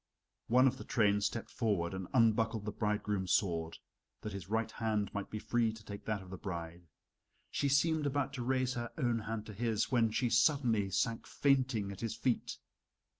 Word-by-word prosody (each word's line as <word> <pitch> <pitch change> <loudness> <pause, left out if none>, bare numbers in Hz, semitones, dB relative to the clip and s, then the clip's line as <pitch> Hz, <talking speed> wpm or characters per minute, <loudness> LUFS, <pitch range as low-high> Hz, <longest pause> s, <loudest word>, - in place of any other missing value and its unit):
One 125 +3 +5
of 130 - +2
the - - -6
train 105 -2 +2
stepped 105 +3 -2
forward 100 -7 0
and 95 -1 -4
unbuckled 115 -2 +3
the 105 - -2
bridegroom's 105 -2 -1
sword, 85 -4 0 0.4
that 105 - -5
his 95 -2 -7
right 110 +1 0
hand 110 -3 -1
might 100 -1 -4
be 110 - -4
free 110 +1 +1
to 110 -1 -12
take 100 0 -8
that 105 -3 -2
of 95 - -13
the 95 - -7
bride. 85 -2 -6 0.6
She 140 - 0
seemed 150 +2 +3
about 140 -1 -1
to 125 - -3
raise 130 0 +1
her 120 -1 -4
own 120 -6 +1
hand 110 0 -4
to 105 - -8
his, 110 +3 0
when 115 -3 +3
she 120 +2 0
suddenly 115 -5 +3
sank 115 +3 -1
fainting 130 -7 +1
at 100 - -9
his 115 -1 -2
feet. 120 +1 -1
110 Hz, 190 wpm, -34 LUFS, 100-120 Hz, 0.6 s, One